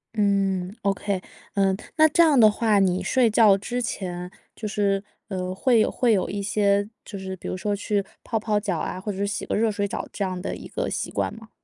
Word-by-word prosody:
嗯 195 -2 +1
，okay。 195 -1 -1 0.3
嗯， 195 -1 +2 0.2
那 315 0 +7
这 340 +3 +5
样 295 -6 +5
的 215 -1 +8
话， 210 -1 +2
你 185 -1 +2
睡 250 -3 +3
觉 210 -2 +6
之 245 +5 -3
前， 180 -5 -4 0.2
就 215 - -5
是， 200 -1 0 0.2
呃， 185 -2 -3
会 240 +3 +3
有 - - +2
会 240 -3 +2
有 190 - +1
一 205 - -3
些， 200 0 +1 0.2
就 200 -3 -7
是 190 0 -5
比 - - -9
如 - - -2
说 205 +2 -1
去 205 0 -1 0.2
泡 225 -2 -1
泡 210 -1 0
脚 195 -5 -2
啊， 185 - -3
或 210 +2 -4
者 190 - -7
是 200 0 0
洗 200 - -3
个 - - -2
热 220 +1 +2
水 205 -1 -1
澡 - - -4
这 200 - -3
样 185 -1 -3
的 - - -3
一 - - -9
个 - - -3
习 - - -3
惯 - - -1
吗？ 220 -1 -12
200 Hz, 265 characters per minute, -24 LUFS, 190-215 Hz, 0.3 s, 的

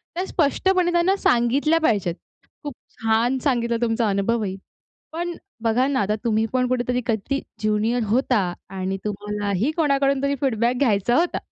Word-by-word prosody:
त्या 365 - -1
स्पष्टपणे 350 +3 +1
त्यांना 345 +3 +3
सांगितल्या 275 +3 +2
पाहिजेत. 200 - +1 0.5
खूप 290 -2 -5 0.3
छान 225 +3 +2
सांगितला 235 -4 +1
तुमचा 225 -1 +1
अनुभवही. 200 0 0 0.6
पण 345 +2 -3 0.3
बघा 230 +3 +2
ना, 280 -2 0
आता 210 +1 +1
तुम्ही 220 -2 +1
पण 250 -1 +2
कुठेतरी 250 0 0
कधी 230 +5 -1 0.2
ज्युनियर 220 +3 0
होता 250 +2 +2 0.3
आणि 190 0 -3
तुम्हालाही 205 - -2
कोणाकडून 275 -3 +2
तरी 280 0 +1
फीडबॅक 240 -2 +1
घ्यायचा 240 -2 +2
होता. 345 +4 +1
240 Hz, 140 wpm, -23 LUFS, 215-280 Hz, 0.6 s, त्यांना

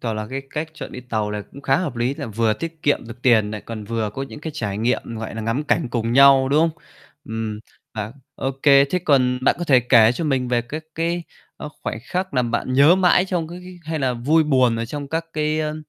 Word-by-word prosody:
toả 115 - -2
là 110 0 -4
cái 135 +1 -4
cách 155 +1 -3
chọn 150 - -8
đi 125 - -7
tàu 110 -4 -2
này 105 0 -4
cũng 140 - -11
khá 135 - +2
hợp 165 -9 -3
lý, 120 +3 0
là - - -6
vừa 110 0 +1
tiết 165 +7 -6
kiệm 145 -5 +1
được 120 +1 -11
tiền 110 -5 +4
nại 105 -1 -5
còn 110 -1 -7
vừa 110 0 -2
có 135 - -3
những 135 +2 -8
cái 160 - -5
trải 105 -8 -3
nghiệm, 120 +3 +1 0.2
gọi 110 -2 -6
nà, 110 - -4
ngắm 115 +7 -1
cảnh 135 - +1
cùng 115 -1 -1
nhau, 135 0 +6
đúng 145 +3 +3
không? 165 0 -1 0.4
Ừm 110 -4 -4 0.3
hả, 110 0 -4 0.2
ô 135 - -2
kê, 140 -1 +7
thế 160 +6 -1
còn 130 -7 +2
bạn - - +4
có 175 - -2
thể 135 -6 +5
kể 120 -2 +5
cho 165 - -4
mình 135 -4 0
về 120 -1 +1
các 155 +6 -7
cái, 170 +1 -1 0.3
ơ, - - -7
khoảnh - - -3
khắc 185 +5 -3
làm 125 -2 +1
bạn 120 +2 -1
nhớ 145 +6 +7
mãi 180 -1 +4
trong, 175 -4 -2
cái 175 +2 -8
cái 180 -1 -11
hay 160 0 -3
là 130 -3 0
vui 145 +7 +3
buồn 130 -5 +3
ở 115 - -2
trong 140 +4 -6
các 165 +2 -2
cái, 155 0 0
ơ 150 0 -2
135 Hz, 255 wpm, -21 LUFS, 115-155 Hz, 0.4 s, kê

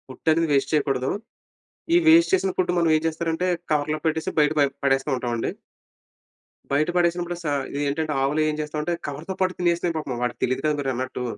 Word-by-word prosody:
Food 130 +5 -3
అనేది 165 +1 +2
waste 140 -1 +2
చేయకూడదు. 135 -4 +1 0.9
ఈ - - +7
వేస్ట్ 330 +3 +6
చేసిన 195 - +1
ఫుడ్ 180 -1 +1
మనం 170 -1 +3
ఏం 155 - -1
చేస్తారంటే, 165 +2 -1 0.2
కవర్‌లో 150 +1 0
పెట్టేసి, 160 0 0
బయట 150 0 +4
ప - - +5 0.2
పడేస్తూ 135 +1 +2
ఉంటాం 125 -1 -3
అండి. 115 - -1 1.2
బయట 145 +4 +2
పడేసినప్పుడు 175 0 +1
సా 150 - -1 0.2
ఇదేంటంటే 145 +2 -1
ఆవులు 145 +3 +1
ఏం - - -1
చేస్తామంటే, 150 +2 -3
కవర్‌తో 155 +7 -5
పాటు 185 -1 +2
తినేస్తాయి 170 -1 +1
పాపం. 135 -5 -4
వాడికి 120 -1 -3
తెలియదు 130 +2 0
కదా! 150 -1 +2
మీరన్నట్టు. 130 -2 -3
155 Hz, 175 wpm, -24 LUFS, 140-170 Hz, 1.2 s, ఈ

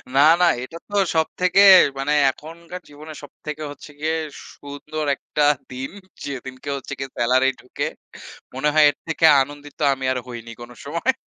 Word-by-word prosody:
না, 140 - +6 0.2
না। 180 - +6 0.2
এটা 165 +6 -9
তো 205 - -6 0.2
সব 160 0 +2
থেকে 180 +2 +4 0.4
মানে 140 +2 0 0.2
এখনকার 170 +5 -11
জীবনে 155 +2 -11
সব 145 - -11
থেকে 150 0 -5
হচ্ছে 145 +1 -12
গিয়ে 160 +1 -1 0.4
সুন্দর 145 +2 -7
একটা 150 +2 -1 0.3
দিন। 130 +1 -6 0.3
যেদিনকে 130 0 -7
হচ্ছে 140 - -8
গিয়ে 135 - -5
সেলারি 130 +3 +3
ঢুকে। 125 - -4 0.7
মনে 135 +3 0
হয় 155 -1 +6
এর - - -4
থেকে 160 0 +1 0.2
আনন্দিত 145 +1 -7
আমি 135 -1 -5
আর 130 - -1
হইনি 115 -1 -8
কোন 120 +1 -10
সময়। 170 - 0
145 Hz, 165 wpm, -22 LUFS, 130-155 Hz, 0.7 s, না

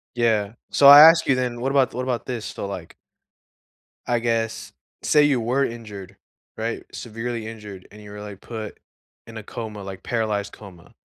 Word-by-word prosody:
Yeah, 110 -3 +1 0.2
so, 140 - +5
I 145 +1 +11
ask 165 +2 +7
you 130 - +3
then, 125 -2 -2
what 135 +3 -1
about 135 -2 +2
what 125 - -3
about 125 -3 -3
this? 120 -4 -5
So, 100 - -6
like 95 -4 -8 1.1
I 120 -1 +1
guess 115 -1 -2 0.3
say 150 -1 +4
you 140 -4 +2
were 130 +5 +1
injured, 105 -5 -9 0.4
right, - - -4
severely 115 0 -5
injured 105 -4 -10
and 105 - -14
you 105 -1 -12
were, 105 0 -9
like, 105 -2 -9
put 110 -3 -8 0.5
in 115 -1 -10
a 110 - -8
coma, 110 -1 -7
like, 95 -1 -9
paralyzed 105 -3 -2
coma. 95 -5 -14
115 Hz, 180 wpm, -23 LUFS, 105-125 Hz, 1.1 s, I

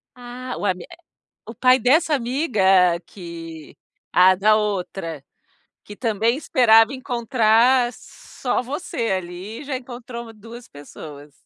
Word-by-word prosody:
Ah! 250 +1 -8
O - - -4
ami 180 -2 -1
eh, - - -13 0.5
o 225 +1 -10
pai 255 +2 +4
dessa 310 +5 +3
amiga 255 -3 -1 0.4
que 165 -4 -10 0.4
Ah, 185 +1 +6
da 215 +3 +3
outra. 185 -7 -3 0.6
Que 205 - -11
também 230 +2 0
esperava 235 -5 +4
encontrar 245 -1 +2
só 250 - -5
você 250 - -4
ali, 185 +4 -5
e - - -9
já 275 - -3
encontrou 240 -2 -8
2 230 +3 -12
pessoas. 145 0 -12
230 Hz, 125 wpm, -21 LUFS, 190-250 Hz, 0.6 s, Ah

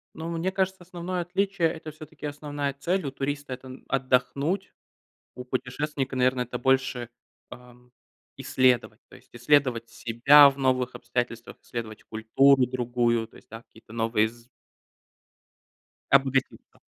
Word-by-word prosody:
Ну, 160 +1 -5
мне 170 +2 -1
кажется, 190 -1 -1
основное 180 +1 -5
отличие- 185 0 0
это, 160 -1 -8
всё-таки, 155 0 -11
основная 145 -1 -4
цель. 170 +6 -1
У 140 - -3
туриста- 140 +1 -4
это 130 +1 -10
отдохнуть. 135 +7 0 0.6
У 125 - -8
путешественника, 135 +2 -3
наверно, 125 0 +2
это 125 0 -5
больше, 130 -2 +1 0.4
ам, 125 0 -15 0.5
исследовать. 130 -2 +1
То - - -14
есть - - -23
исследовать 120 -2 +2
себя 140 +6 +6
в 135 - -11
новых 130 -2 +1
обстоятельствах, 120 -1 -4
исследовать 110 -2 -7
культуру 130 +4 +3
другую, 120 -2 0
то - - -20
есть, - - -18
да, 110 +1 -10
какие-то 110 -1 -17
новые 115 -1 +1
з 120 +1 -17 1.6
Обогатиться. 135 -1 +1
130 Hz, 130 wpm, -26 LUFS, 120-145 Hz, 1.6 s, себя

